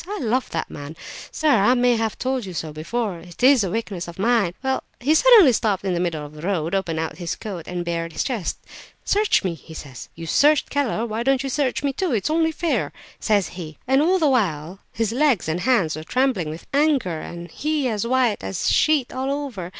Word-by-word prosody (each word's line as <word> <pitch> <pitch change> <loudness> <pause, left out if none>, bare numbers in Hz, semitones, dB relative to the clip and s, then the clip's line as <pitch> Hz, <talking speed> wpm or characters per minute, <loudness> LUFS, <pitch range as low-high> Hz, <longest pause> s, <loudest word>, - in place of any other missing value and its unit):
I 415 +2 -4
love 250 0 0
that 165 - -3
man, 145 +2 -9 0.4
sir; 315 - -1
I 235 +1 +4
may 245 -1 +3
have 225 -1 -2
told 260 -1 -1
you 185 - -7
so 155 -2 -4
before; 185 +4 -3
it 175 +6 -11
is 260 -3 +6
a 190 - -1
weakness 200 -4 -4
of 170 - -9
mine. 200 -4 +2
Well—he 265 +1 -1
suddenly 410 - +7
stopped 205 -4 0
in 190 - 0
the 175 - -1
middle 165 -4 -2
of 145 - -12
the 150 - -11
road, 170 -2 -1
opened 180 -4 -1
out 160 +3 -4
his 170 -2 -3
coat 185 -7 -7
and 175 -1 -4
bared 165 -1 -3
his - - -2
breast. 235 -9 -2 0.5
'Search 415 0 +2
me,' 185 -3 -1
he 160 0 -12
says, 140 -4 -9
'you 165 - -7
searched 295 - +3
Keller; 255 -5 0
why 225 0 -3
don't 270 +1 +2
you 270 - -3
search 265 -1 -1
me 280 -1 0
too? 350 0 -1
It 215 - 0
is - - -1
only 320 0 +2
fair!' 330 +1 -1 0.3
says 205 -6 +1
he. 160 -4 -8
And 265 +2 +3
all 360 +5 +3
the 320 -4 +2
while 185 - 0
his 225 -1 -1
legs 255 - +2
and 160 +2 -1
hands 190 -8 +2
were 155 - -7
trembling 250 - 0
with 160 +2 -8
anger, 275 - +2
and 170 +1 -8
he 300 -2 -1
as 220 -1 -2
white 250 -3 +1
as 95 0 -3
a - - +3
sheet 300 -5 +2
all 260 +1 -2
over! 265 -12 -4
220 Hz, 225 wpm, -22 LUFS, 170-265 Hz, 0.5 s, suddenly